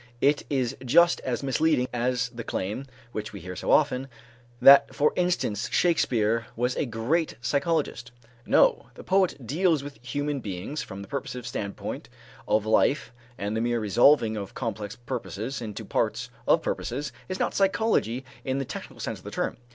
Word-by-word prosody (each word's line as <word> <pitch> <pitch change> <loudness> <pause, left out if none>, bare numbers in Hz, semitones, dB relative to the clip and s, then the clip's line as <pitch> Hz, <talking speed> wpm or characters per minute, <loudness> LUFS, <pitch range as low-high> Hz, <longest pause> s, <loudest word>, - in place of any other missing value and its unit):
It 145 +2 +3
is 130 -2 0
just 170 +8 +5
as 125 0 -2
misleading 135 -1 +2
as 125 0 0
the 120 -1 -7
claim, 105 +9 -3 0.2
which 105 -2 -5
we 100 - -7
hear 90 +1 -7
so - - -5
often, 130 +1 +3 0.5
that 140 +3 +8
for 150 - +3
instance 175 - 0
Shakespeare 115 -9 +2
was 125 +2 0
a - - -1
great 125 +9 0
psychologist. 140 -2 -1 0.3
No, - - +3
the - - -10
poet 185 -8 +1
deals 160 - +2
with 140 -4 -10
human 145 +3 -2
beings 105 +7 -5
from 100 -1 -7
the - - -11
purposive 125 -1 -5
standpoint 105 +4 -5 0.4
of 110 0 +2
life 115 +5 +2 0.2
and 100 +2 -3
the 110 - 0
mere 120 0 +1
resolving 110 +2 +4
of 100 -2 -6
complex 110 -4 -4
purposes 120 0 -5
into 110 -3 -6
parts - - -1 0.2
of - - +4
purposes 145 +1 -3 0.2
is 185 - -2
not - - 0
psychology 195 - +1 0.2
in 130 -1 -1
the 135 - -2
technical - - -8
sense - - -4
of - - -20
the - - -5
term. - - -2
125 Hz, 165 wpm, -26 LUFS, 110-145 Hz, 0.5 s, that